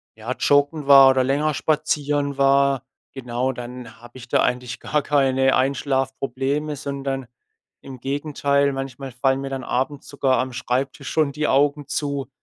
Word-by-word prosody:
ja, 110 +3 -6
joggen 145 +1 +2
war 135 -1 +9
oder 130 -1 +3
länger 145 +3 +1
spazieren 145 -1 -1
war. 140 -1 +3 0.3
Genau, 125 0 -2
dann 125 -2 -9
habe 120 +2 -14
ich 125 -1 -12
da - - +3
eigentlich 125 0 -2
gar 150 - -1
keine 135 -2 +2
Einschlafprobleme, 135 +2 -1
sondern 135 -2 -4 0.5
im 135 -2 -10
Gegenteil, 140 +1 0
manchmal 135 0 -6
fallen 135 +2 0
mir 135 - -5
dann 135 -2 -5
abends 135 +3 -2
sogar 135 -2 +1
am 130 -1 -2
Schreibtisch 130 +3 -3
schon 155 -3 +1
die 150 +1 -1
Augen 145 +1 +2
zu. 140 -3 -3
135 Hz, 150 wpm, -22 LUFS, 130-140 Hz, 0.5 s, war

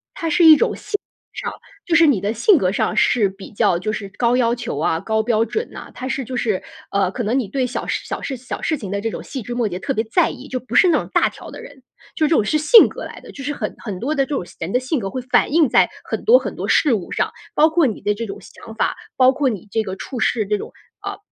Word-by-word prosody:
它 330 - -3
是 340 +2 +3
一 315 -1 +10
种 - - +1
性 - - -13
格 - - -9
上 - - -9 0.3
就 335 - +1
是 330 0 +7
你 250 -10 +3
的 205 +2 -1
性 340 - +4
格 185 -6 +1
上 - - -1
是 215 -5 +3
比 195 0 -12
较 180 -3 +2
就 215 +4 -2
是 200 -2 -5
高 240 0 +2
要 235 -2 +2
求 235 - -5
啊、 160 +2 0
高 220 +3 0
标 225 -1 +2
准 445 - -3
呐。 - - -10
它 255 - -6
是 270 0 -2
就 255 +2 -6
是， 215 -5 0 0.3
呃， 195 -2 +1
可 240 - -4
能 230 +6 0
你 230 - -3
对 255 +5 -1
小 250 - -4
事 - - -2
小 - - -5
事 270 - -4
小 250 +1 -7
事 310 - 0
情 200 -7 -7
的 200 - -1
这 225 - -1
种 - - -6
细 265 - -6
枝 240 +2 -6
末 235 -3 +1
节 180 - -5
特 270 +7 -2
别 220 - 0
在 220 - +2
意， 275 - -9
就 255 -2 -3
不 240 -1 -8
是 365 - +7
那 320 - +4
种 - - -7
大 - - +3
条 - - -12
的 - - -9
人。 265 - -14 0.3
就 310 - +2
是 - - +1
这 320 - +3
种 215 - +3
是 305 +9 +1
性 315 +10 +7
格 - - -8
来 - - -9
的， - - -12
就 275 - -9
是 290 - -2
很 215 -7 -4
很 195 -5 -6
多 295 +5 -1
的 275 -2 +2
这 285 - -3
种 180 - -3
性 - - -16
人 165 +4 -4
的 250 - +2
性 260 +2 -2
格 195 -2 -4
会 255 - -4
反 250 +1 +2
映 320 -3 +5
在 - - +4
很 - - -4
多 480 +3 +8
很 - - -6
多 - - -4
事 290 -6 +3
物 190 -5 -3
上， - - -1 0.2
包 310 +2 +5
括 320 -1 +3
你 220 - -4
的 210 - +1
这 230 +3 -5
种 200 -1 -7
想 225 +4 -12
法， - - 0 0.2
包 260 0 +5
括 270 -1 0
你 210 -2 -6
这 225 -1 0
个 190 -2 -5
处 245 +5 -7
事 220 -1 +1
这 210 +1 0
种， - - -8 0.3
啊， 400 -1 -5
245 Hz, 320 characters per minute, -20 LUFS, 210-285 Hz, 0.3 s, 一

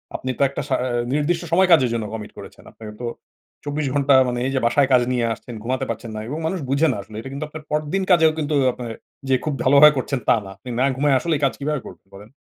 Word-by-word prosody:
আপনি 130 - -4
তো - - -5
একটা 140 - -4
সা 135 - +1
আ - - -1 0.3
নির্দিষ্ট 165 +4 0
সময় 185 +3 +4
কাজের 135 -7 +5
জন্য 115 -2 -2
কমিট 105 -2 -6
করেছেন। - - -12
আপনার 110 - -12
তো 120 - -3 0.6
২৪ 145 0 -2
ঘন্টা 140 -1 +3
মানে 120 0 -2
এই 135 - -1
যে - - +2
বাসায় 125 +4 +3
কাজ 125 - +6
নিয়ে 120 -2 +1
আসছেন 120 +2 -10
ঘুমাতে 130 +2 -2
পারছেন 115 - -5
না। - - -4
এবং 145 +5 -4
মানুষ 185 +2 -2
বুঝে 140 +4 +3
না - - -5
আসলে। 105 +2 -13
এটা 135 - -8
কিন্তু 140 +3 -4
আপনার 155 0 -10
পরদিন 150 +6 -1
কাজেও 160 -3 +5
কিন্তু 150 -1 -2
ও - - +2
আপনি 125 - -8 0.4
যে 130 - +4
খুব 155 - -2
ভালোভাবে 140 +3 +7
করছেন 130 +1 -2
তা - - +6
না। - - -9
আপনি 100 - -11
না - - +3
ঘুমায়ে 140 0 +3
আসলেই 155 0 -1
কাজ 135 - +1
কিভাবে 150 0 -2
করবেন - - -13
বলেন? 100 +2 -13
140 Hz, 250 wpm, -21 LUFS, 125-150 Hz, 0.6 s, ভালোভাবে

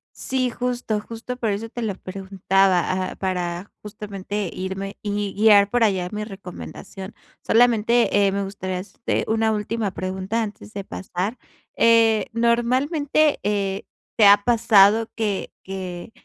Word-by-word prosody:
Sí, 255 -1 -1
justo, 245 -3 -2
justo 230 +3 -7
por 225 -4 -1
eso 220 +3 -4
te 240 +1 -6
lo 205 -4 -2
preguntaba, 190 -1 0
ah, - - -9
para 180 0 -3
justamente 205 -2 -5
irme 190 +1 -5
y 205 -1 -2
guiar 205 -1 +5
por 240 +1 +2
allá 185 -3 0
mi 210 0 -4
recomendación. 195 0 -9 0.3
Solamente, 230 -3 +3
eh, - - +1
me 200 0 -1
gustaría, 190 -2 -4
este, 200 +4 -3
una 220 0 +2
última 210 -1 -2
pregunta 190 +4 -2
antes 210 0 -8
de 200 - -5
pasar. 190 +5 -4 0.4
Eh, 230 -1 +4
normalmente, 260 +6 +2
eh, 200 -1 -1 0.3
¿te 215 - +6
ha 200 0 +7
pasado 225 -2 +5
que 210 -4 -2
que 185 +1 -6
205 Hz, 135 wpm, -22 LUFS, 195-230 Hz, 0.4 s, ha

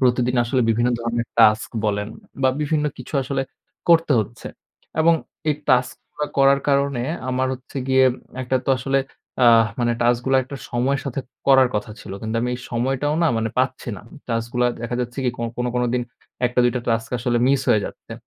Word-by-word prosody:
প্রতিদিন 125 -1 +2
আসলে 125 +2 0
বিভিন্ন 120 +2 +2
ধরনের 115 0 -2
টাস্ক 110 -1 +5 0.2
বলেন, 105 0 -1 0.3
বা 130 - +5
বিভিন্ন 150 0 0
কিছু - - -9
আসলে 135 +1 -2 0.5
করতে 165 -3 +5
হচ্ছে 115 +3 -7 0.5
এবং 165 +1 +5 0.3
এই 150 - +3
টাস্ক 125 0 +3 0.2
গুলা 150 - -3
করার 135 0 +5
কারণে 140 -3 +1 0.3
আমার 130 +1 0
হচ্ছে 130 +2 -13
গিয়ে 130 0 +5 0.4
একটা 130 +1 0
তো - - +2
আসলে 135 +2 +1 0.5
আ - - +7 0.3
মানে 120 0 +2
টাস্ক 120 0 +3
গুলা 135 0 +4
একটা 140 +2 -8
সময়ের 130 +3 0
সাথে 135 -1 -3 0.3
করার 135 -2 +6
কথা 105 +1 -2
ছিল। - - -9
কিন্তু 110 +1 -2
আমি 125 - -1
এই 125 - -7
সময়টাও 135 +5 0
না 165 - +4 0.3
পাচ্ছি 130 0 -1
না। - - -10 0.3
টাস্ক 115 -1 -1
গুলা 125 0 +3 0.2
দেখা 120 +1 -3
যাচ্ছে 120 +2 -5
কি 125 - +2
কো - - -5
কোন, 125 - -1
কোন 125 - +1
দিন 125 - +1 0.4
১ 120 - +2
টা 125 - +4
২ 120 - +3
টা - - -1
টাস্ক 115 0 0
আসলে 120 +1 0
মিস 135 0 +3
হয়ে 105 - +4
যাচ্ছে - - -10
125 Hz, 195 wpm, -22 LUFS, 120-135 Hz, 0.5 s, আ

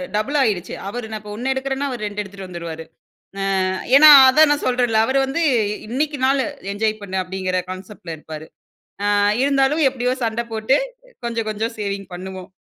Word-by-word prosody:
Double 215 +8 0
ஆயிருச்சு. 200 -8 -1
அவர் 240 +3 -5
நான் 215 -1 -5
இப்போ 210 0 -9
1 250 +5 -2
எடுக்கிறேன்னா, 270 +1 -2
அவர் 245 -4 -5
2 205 0 -4
எடுத்துகிட்டு 195 -1 -9
வந்துருவாரு. 165 -2 -7 0.8
அ - - 0 0.3
ஏன்னா 305 +2 +9 0.2
அதான் 305 +3 +5
நான் 290 - -1
சொல்றேன்ல, 245 -3 +2
அவர் 265 +2 +1
வந்து 275 +6 -2 0.5
இன்னைக்கு 285 +5 -2
நாள் 270 0 +2 0.3
என்ஜாய் 215 +1 -1
பண்ணு 190 -1 -4
அப்படிங்கிற 185 0 -2
கான்செப்ட் 185 0 -10
ல - - -3
இருப்பாரு. 155 0 -9 0.7
அ - - +3 0.3
இருந்தாலும் 280 +2 +2
எப்படியோ 250 -1 -1
சண்டை 230 +1 -2
போட்டு, 220 +5 +2 0.5
கொஞ்சம் 230 -2 -3
கொஞ்சம் 220 +2 -3
சேவிங் 200 -1 -4
பண்ணுவோம். 185 0 -8
220 Hz, 165 wpm, -20 LUFS, 190-265 Hz, 0.8 s, ஏன்னா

